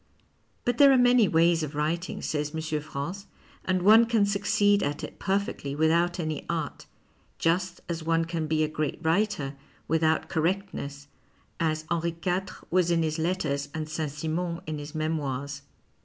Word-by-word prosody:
But 245 -1 0
there 280 -1 +8
arc 265 - +5
many 245 -3 +5
ways 165 0 +3
of 150 -1 -4
writing, 165 +4 -2
says 150 0 -2
M. 155 -1 -2
France, 170 +7 -5 0.4
and 185 -1 +1
one 220 +4 +7
can 225 -3 +3
succeed 205 0 +2
at 145 -2 -2
it - - -8
perfectly 190 -8 -1
without 170 +3 +2
any 155 -3 -2
art, 160 -5 -3 0.5
just 180 +2 0
as 170 -1 -3
one 165 +1 +1
can 165 -2 -3
be 155 0 +2
a - - +1
great 155 -1 -2
writer 160 -4 0 0.3
without 160 0 +2
correctness, 160 -5 -2 0.5
as 155 -1 0
Henri 170 0 0
IV. 185 +1 -2
was 180 -1 +3
in 165 -1 +2
his 155 0 -1
letters 150 -5 -1
and 155 -1 -3
Saint 155 -1 -3
Simon 165 +4 -3
in 155 -1 -4
his 145 +1 -8
memoirs. 140 -3 -2
165 Hz, 160 wpm, -27 LUFS, 155-185 Hz, 0.5 s, there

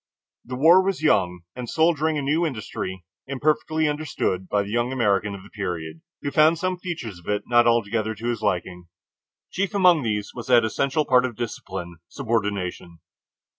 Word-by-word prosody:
The 125 - -6
war 165 +8 +6
was 190 -4 -2
young 90 - +2
and 125 -2 -6
soldiering 160 -1 +2
a 145 - -2
new 150 +5 +1
industry, 105 - -4 0.2
imperfectly 155 +3 0
understood 145 -11 -2
by 105 -1 +1
the 100 - -7
young 120 +2 0
American 105 -5 +1
of 95 - -11
the - - -16
period, 80 -6 -5 0.2
who 140 - -2
found 155 +3 +5
some 185 +1 -2
features 130 - -6
of 85 - -19
it 105 0 0
not 120 0 +4
altogether 110 -1 +1
to 115 +3 -5
his 120 - -2
liking. 90 -3 -2 0.6
Chief 200 +2 -2
among 180 -5 +5
these 105 -4 -2
was 120 - -8
that 120 -3 +5
essential 140 +7 0
part 125 -2 +4
of 125 -3 -3
discipline, 95 -6 -6
subordination. 100 -8 -3
120 Hz, 170 wpm, -24 LUFS, 100-150 Hz, 0.6 s, war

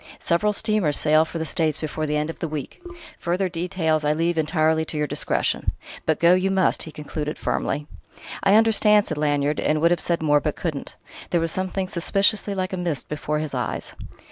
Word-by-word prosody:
Several 190 +5 +1
steamers 210 -7 +1
sail 155 +1 +4
for 165 - -6
the 160 - -2
States 155 -1 0
before 155 0 -3
the 150 0 0
end 150 +2 -1
of - - -15
the 165 - -2
week: 150 - -6 0.4
further 180 +3 0
details 165 -3 -1
I 150 0 +2
leave 165 +2 0
entirely 160 0 +1
to 155 - -5
your 150 - +1
discretion. - - -1 0.3
But 160 - +2
go 170 +1 +6
you 185 +1 +2
must," 190 -1 +2
he 160 - -4
concluded 150 0 -5
firmly. 145 +2 -2 0.6
"I 195 +1 +4
understand..." 215 -2 +5
said 155 -2 -4
Lanyard; 145 0 +1
and 155 0 +1
would 170 +2 +3
have 175 - +1
said 170 -2 0
more, 150 -1 +4
but 150 0 -2
couldn't. 155 -5 -5 0.3
There 175 - +2
was 165 0 0
something 185 +1 -2
suspiciously 200 +3 +1
like 185 0 -2
a - - -2
mist 170 -6 -3
before 150 0 -2
his 155 -2 -4
eyes. 125 -3 -3
160 Hz, 200 wpm, -23 LUFS, 150-185 Hz, 0.6 s, go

